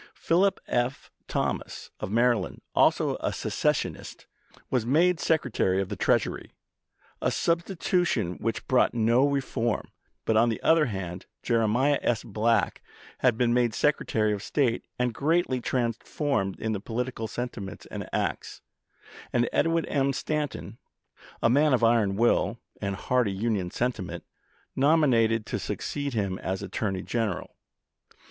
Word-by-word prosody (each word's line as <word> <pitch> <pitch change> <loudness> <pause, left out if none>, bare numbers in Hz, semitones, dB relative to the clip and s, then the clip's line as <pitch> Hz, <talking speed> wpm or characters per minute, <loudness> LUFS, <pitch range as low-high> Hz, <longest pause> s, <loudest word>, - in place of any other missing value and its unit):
Philip 190 +4 +2
F. 120 +2 -1 0.2
Thomas, - - -3
of - - -4
Maryland, 115 -2 +1
also - - +3
a - - -2
secessionist, - - -2 0.5
was 125 -3 +2
made 165 +9 +3
Secre 145 -8 0
tary 95 0 +2
of 95 -1 -2
the - - -3
Treasury, - - 0 0.7
a - - +2
substitution 170 - 0
which 115 -1 -3
brought 130 -2 +3
no 120 +4 +4
reform; 130 -5 -1 0.3
but 110 - +2
on 115 +2 +5
the 115 - -2
other 160 -2 +4
hand 95 -4 -5 0.2
Jeremiah 120 +5 +2
S. 115 -2 0
Black 115 +1 +1 0.4
had 125 -4 +3
been 120 -1 +2
made 120 -2 +2
Secretary 110 -7 +1
of 100 - -4
State, 120 0 0
and 125 -1 0
greatly 150 -2 +1
trans 120 -2 0
formed 125 -12 -2
in 110 0 -1
his 100 - -3
political 115 0 -3
sentiments 110 -4 -6
and - - -6
acts, - - -3 0.7
and 120 -1 +2
Edwin 165 0 +2
M. 140 -1 +1
Stanton, 150 +1 -3 0.6
a - - +5
man 145 +1 +4
of 120 - -2
iron 115 -4 +3
will 115 +3 +2 0.2
and 100 -1 -2
hearty 120 -1 +1
Union 100 -3 -1
sentiment, 115 -4 -3 0.5
nominated 125 -7 +3
to 105 - -3
succeed 130 +8 -3
him 100 -3 -1
as 95 +1 -3
Attorney 95 -1 -2
General. 115 -6 -2
120 Hz, 140 wpm, -27 LUFS, 105-140 Hz, 0.7 s, on